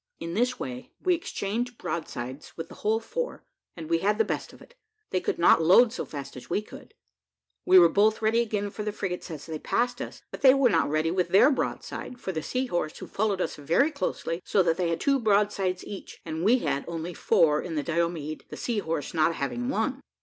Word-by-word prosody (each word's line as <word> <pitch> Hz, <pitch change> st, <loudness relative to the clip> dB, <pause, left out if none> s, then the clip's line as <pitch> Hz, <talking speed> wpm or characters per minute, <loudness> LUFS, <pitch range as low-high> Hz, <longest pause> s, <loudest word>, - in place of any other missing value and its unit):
In 165 Hz, 0 st, -5 dB
this 245 Hz, +5 st, 0 dB
way 125 Hz, -1 st, -6 dB
we 365 Hz, -, +2 dB
exchanged 245 Hz, -, -3 dB
broadsides 130 Hz, -3 st, -5 dB
with 165 Hz, -, -6 dB
the -, -, -10 dB
whole 220 Hz, +1 st, +2 dB
four, -, -, -4 dB, 0.3 s
and 160 Hz, -2 st, -7 dB
we 165 Hz, 0 st, +2 dB
had 210 Hz, +4 st, +1 dB
the 225 Hz, -, +3 dB
best -, -, -3 dB
of -, -, -16 dB
it, -, -, -17 dB, 0.4 s
they 185 Hz, -, +1 dB
could -, -, -1 dB
not 170 Hz, -1 st, +5 dB
load 215 Hz, +8 st, +6 dB
so -, -, -4 dB
fast 140 Hz, -2 st, -8 dB
as 125 Hz, -, -10 dB
we -, -, +1 dB
could. -, -, -13 dB, 0.7 s
We 185 Hz, -, +8 dB
were 175 Hz, -2 st, +9 dB
both 210 Hz, +5 st, +3 dB
ready 225 Hz, +1 st, +2 dB
again 210 Hz, -3 st, -2 dB
for 210 Hz, -, -6 dB
the 210 Hz, 0 st, -2 dB
frigates 185 Hz, -3 st, -4 dB
as 155 Hz, -4 st, -7 dB
they 160 Hz, -2 st, -5 dB
passed 245 Hz, +7 st, 0 dB
us, -, -, -7 dB
but -, -, -8 dB
they 265 Hz, -2 st, +7 dB
were 270 Hz, -4 st, +4 dB
not -, -, +2 dB
ready 155 Hz, +2 st, +1 dB
with 180 Hz, -1 st, +1 dB
their 195 Hz, +11 st, +6 dB
broadside, 255 Hz, -2 st, -4 dB
for 190 Hz, -, -4 dB
the 160 Hz, -3 st, -3 dB
Sea 255 Hz, +10 st, -1 dB
horse, 175 Hz, -8 st, -2 dB
who -, -, -7 dB
followed 200 Hz, -2 st, -1 dB
us 165 Hz, -, -2 dB
very 165 Hz, -, +2 dB
closely, 180 Hz, -, -3 dB
so 195 Hz, -, +2 dB
that 165 Hz, -2 st, +1 dB
they 175 Hz, -2 st, 0 dB
had 165 Hz, -, -1 dB
two 275 Hz, -1 st, +2 dB
broadsides 200 Hz, -4 st, +1 dB
each, 200 Hz, -, -9 dB
and 160 Hz, 0 st, -4 dB
we 230 Hz, +6 st, +5 dB
had 140 Hz, -, -1 dB
only 170 Hz, +1 st, -4 dB
four 150 Hz, -2 st, +3 dB
in 170 Hz, -3 st, -5 dB
the 150 Hz, -, -1 dB
Diomede, 165 Hz, -2 st, -2 dB
the -, -, -8 dB
Sea 235 Hz, -3 st, -1 dB
horse 165 Hz, -5 st, -3 dB
not 160 Hz, 0 st, +2 dB
having 120 Hz, -3 st, -2 dB
one. 255 Hz, +6 st, -1 dB
185 Hz, 225 wpm, -27 LUFS, 160-225 Hz, 0.7 s, were